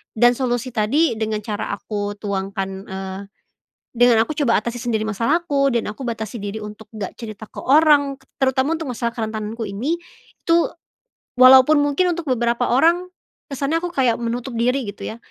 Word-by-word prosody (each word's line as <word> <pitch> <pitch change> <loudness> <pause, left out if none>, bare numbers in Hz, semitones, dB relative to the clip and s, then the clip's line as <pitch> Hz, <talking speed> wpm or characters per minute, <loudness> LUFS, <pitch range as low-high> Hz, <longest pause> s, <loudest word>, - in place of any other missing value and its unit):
dan 240 +2 +5
solusi 250 0 -1
tadi 240 +7 +2
dengan 215 -1 -1
cara 210 -2 -4
aku 205 -1 -4
tuangkan, 195 -1 -3 0.2
eee, 190 0 -6 0.8
dengan 240 -1 +5
aku - - -4
coba 230 -5 +3
atasi 235 +1 -4
sendiri 220 -3 0
masalahku 275 - +1
dan 235 - 0
aku 240 +5 -9
batasi 220 -1 -4
diri 205 +2 -5
untuk 210 +1 -10
nggak 200 -3 -5
cerita 220 -2 -8
ke - - -19
orang 285 -1 +4 0.3
terutama 265 +4 +2
untuk 320 - -5
masalah 235 0 -2
kerentananku 220 0 -4
ini 240 +12 -2 0.5
tuh, 335 0 +4 0.7
walaupun 260 +4 +8
mungkin 320 +5 +1
untuk 340 -1 -6
beberapa 240 0 +1
orang, 340 +7 +3 0.4
kesannya 280 +4 -1
aku 355 - -3
kayak 255 -6 +2
menutup 235 +2 -3
diri 250 +1 +1
gitu 200 - -7
ya 220 - -5
240 Hz, 160 wpm, -21 LUFS, 215-275 Hz, 0.8 s, walaupun